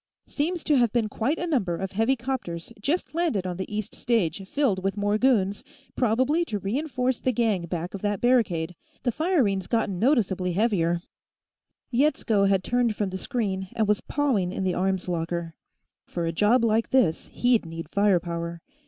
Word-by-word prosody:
"... -, -, -67 dB
Seems 335 Hz, +3 st, -2 dB
to 295 Hz, -3 st, +3 dB
have 240 Hz, -3 st, +3 dB
been 225 Hz, -2 st, +1 dB
quite 260 Hz, +10 st, -1 dB
a 350 Hz, -, -2 dB
number 215 Hz, -, 0 dB
of 195 Hz, +1 st, -4 dB
heavy 225 Hz, +6 st, +2 dB
'copters 235 Hz, -10 st, -4 dB
just 310 Hz, -, -1 dB
landed 315 Hz, -, 0 dB
on 180 Hz, -1 st, -3 dB
the 190 Hz, -, -5 dB
east 210 Hz, -1 st, -3 dB
stage, 215 Hz, -6 st, 0 dB
filled 235 Hz, -11 st, +1 dB
with 195 Hz, +1 st, -1 dB
more 205 Hz, +1 st, +1 dB
goons, 205 Hz, -6 st, +2 dB, 0.3 s
probably 260 Hz, +8 st, +2 dB
to 215 Hz, -, -3 dB
re 200 Hz, +3 st, -3 dB
enforce 260 Hz, -4 st, -1 dB
the 255 Hz, -, +1 dB
gang 210 Hz, -7 st, 0 dB
back 175 Hz, 0 st, -4 dB
of 200 Hz, -, -6 dB
that 205 Hz, -1 st, -1 dB
barricade. 190 Hz, -10 st, +2 dB, 0.3 s
The 245 Hz, -, +1 dB
firing's 235 Hz, -, +1 dB
gotten 220 Hz, -6 st, 0 dB
noticeably 195 Hz, -8 st, +2 dB
heavier 175 Hz, -5 st, +1 dB, 0.5 s
" -, -, -58 dB
Yetsko 235 Hz, -6 st, +2 dB
had 190 Hz, -1 st, +2 dB
turned 245 Hz, -3 st, +1 dB
from 205 Hz, -3 st, -2 dB
the 190 Hz, -, -3 dB
screen, 195 Hz, -7 st, -2 dB
and 220 Hz, -2 st, +1 dB
was 210 Hz, 0 st, +2 dB
pawing 250 Hz, -11 st, 0 dB
in 190 Hz, -, -3 dB
the 185 Hz, -1 st, +1 dB
arms 190 Hz, 0 st, -1 dB
locker. 170 Hz, -1 st, -2 dB, 0.5 s
For 170 Hz, -1 st, -3 dB
a 165 Hz, -, 0 dB
job 215 Hz, +8 st, +3 dB
like 225 Hz, 0 st, +1 dB
this, 250 Hz, -12 st, +2 dB
he'd 245 Hz, -2 st, +2 dB
need 165 Hz, -1 st, -6 dB
firepower. 170 Hz, -3 st, 0 dB
210 Hz, 185 wpm, -26 LUFS, 185-250 Hz, 0.5 s, to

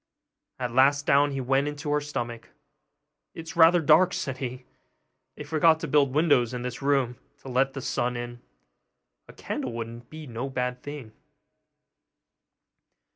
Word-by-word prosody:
At 125 Hz, -2 st, -4 dB
last 140 Hz, +3 st, +4 dB
down 145 Hz, +1 st, +4 dB
he 135 Hz, -1 st, -4 dB
went 135 Hz, +3 st, +1 dB
into 145 Hz, 0 st, -4 dB
her 150 Hz, 0 st, +1 dB
stomach. 120 Hz, -5 st, -5 dB, 0.9 s
'It -, -, -6 dB
is 165 Hz, 0 st, -10 dB
rather 170 Hz, +1 st, +6 dB
dark,' 160 Hz, +4 st, +4 dB
said 135 Hz, -1 st, -3 dB
he; 125 Hz, -1 st, -5 dB, 0.7 s
'they -, -, -7 dB
forgot 160 Hz, 0 st, +3 dB
to 165 Hz, -, -3 dB
build 140 Hz, -1 st, +3 dB
windows 140 Hz, -7 st, +3 dB
in 120 Hz, -, -5 dB
this 125 Hz, +1 st, -5 dB
room 135 Hz, -4 st, +1 dB, 0.2 s
to 135 Hz, -, -9 dB
let 135 Hz, +2 st, +1 dB
the 135 Hz, -, -5 dB
sun 125 Hz, -1 st, -1 dB
in; 120 Hz, 0 st, -7 dB, 0.9 s
a -, -, -13 dB
candle 125 Hz, -, -5 dB
would 115 Hz, +1 st, -7 dB
be 155 Hz, 0 st, -9 dB
no 125 Hz, +1 st, -5 dB
bad 125 Hz, -1 st, -3 dB
thing. 145 Hz, -6 st, -8 dB
135 Hz, 155 wpm, -26 LUFS, 125-150 Hz, 0.9 s, rather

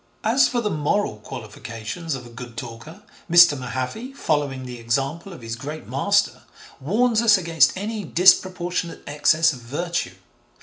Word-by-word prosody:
As 235 Hz, +5 st, +4 dB
for 240 Hz, -, -1 dB
the 210 Hz, -2 st, -1 dB
moral 155 Hz, -, 0 dB
qualifications 115 Hz, +8 st, -6 dB
of 125 Hz, -2 st, -8 dB
a -, -, -11 dB
good 120 Hz, 0 st, -10 dB
talker, 125 Hz, -, -9 dB, 0.3 s
Mr. 175 Hz, -3 st, +7 dB
Mahaffy, 130 Hz, -, -5 dB
following 145 Hz, -, -1 dB
the 125 Hz, -1 st, -8 dB
example 135 Hz, +10 st, -2 dB
of 170 Hz, -, -11 dB
his 115 Hz, 0 st, -4 dB
great 145 Hz, +6 st, -7 dB
master, -, -, +1 dB, 0.4 s
warns 220 Hz, -, +2 dB
us 220 Hz, -3 st, +6 dB
against 165 Hz, -3 st, +2 dB
any 210 Hz, +2 st, -4 dB
disproportionate 180 Hz, 0 st, +2 dB
excess 155 Hz, +2 st, +3 dB
of 130 Hz, -, -9 dB
virtue. 145 Hz, -, -3 dB
155 Hz, 145 wpm, -23 LUFS, 125-185 Hz, 0.4 s, Mr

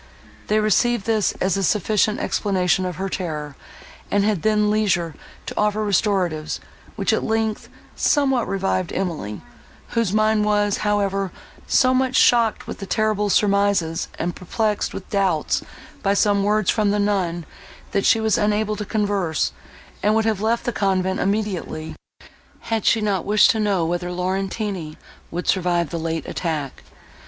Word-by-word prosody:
They 215 Hz, +1 st, +2 dB
received 215 Hz, +1 st, +2 dB
this 220 Hz, -3 st, +1 dB
as 185 Hz, -1 st, 0 dB
a -, -, 0 dB
sufficient 210 Hz, +2 st, +1 dB
explanation 185 Hz, -2 st, +1 dB
of 180 Hz, -, -5 dB
her 195 Hz, +3 st, -3 dB
terror, 150 Hz, -6 st, -4 dB, 0.5 s
and 205 Hz, 0 st, +2 dB
had 205 Hz, -5 st, +1 dB
then 210 Hz, -1 st, +2 dB
leisure 185 Hz, -6 st, +1 dB, 0.3 s
to -, -, -6 dB
offer 210 Hz, 0 st, +1 dB
restoratives, 185 Hz, -6 st, 0 dB, 0.4 s
which, -, -, 0 dB
at -, -, 0 dB
length, 220 Hz, -1 st, -1 dB, 0.3 s
somewhat 270 Hz, -5 st, +2 dB
revived 190 Hz, -2 st, -1 dB
Emily, 160 Hz, -, -3 dB, 0.5 s
whose 230 Hz, -5 st, 0 dB
mind 215 Hz, 0 st, +2 dB
was, 205 Hz, -1 st, +1 dB
however, 195 Hz, -2 st, 0 dB, 0.4 s
so 255 Hz, 0 st, +4 dB
much 260 Hz, 0 st, +1 dB
shocked 235 Hz, -4 st, +4 dB
with -, -, -7 dB
the 195 Hz, -, -6 dB
terrible 215 Hz, 0 st, +1 dB
surmises, 200 Hz, -5 st, +2 dB
and 175 Hz, +1 st, -2 dB
perplexed 210 Hz, +3 st, -1 dB
with 190 Hz, -, -8 dB
doubts 190 Hz, -6 st, +1 dB, 0.4 s
by 200 Hz, 0 st, +1 dB
some 205 Hz, -1 st, +3 dB
words 210 Hz, -1 st, +2 dB
from 215 Hz, -2 st, +1 dB
the 205 Hz, -, +1 dB
nun, 185 Hz, -5 st, 0 dB, 0.5 s
that 200 Hz, -, 0 dB
she 225 Hz, -, +4 dB
was 220 Hz, -1 st, +1 dB
unable 210 Hz, 0 st, +1 dB
to 210 Hz, -, -4 dB
converse, 200 Hz, -6 st, 0 dB, 0.5 s
and 210 Hz, +1 st, +2 dB
would 220 Hz, 0 st, +2 dB
have 215 Hz, -3 st, 0 dB
left 230 Hz, +2 st, +1 dB
the 240 Hz, -, -2 dB
convent 190 Hz, -1 st, 0 dB
immediately, 190 Hz, -6 st, -2 dB, 0.7 s
had 225 Hz, -1 st, -2 dB
she 225 Hz, -, +4 dB
not 205 Hz, -3 st, 0 dB
wished 210 Hz, +4 st, +5 dB
to 225 Hz, -, -2 dB
know 200 Hz, -5 st, +1 dB
whether 175 Hz, +1 st, -2 dB
Laurentini 185 Hz, -2 st, -3 dB, 0.3 s
would 175 Hz, +2 st, -5 dB
survive 175 Hz, -3 st, +1 dB
the 170 Hz, -, -3 dB
late 165 Hz, 0 st, -3 dB
attack. 155 Hz, -6 st, -3 dB
200 Hz, 155 wpm, -22 LUFS, 180-215 Hz, 0.7 s, wished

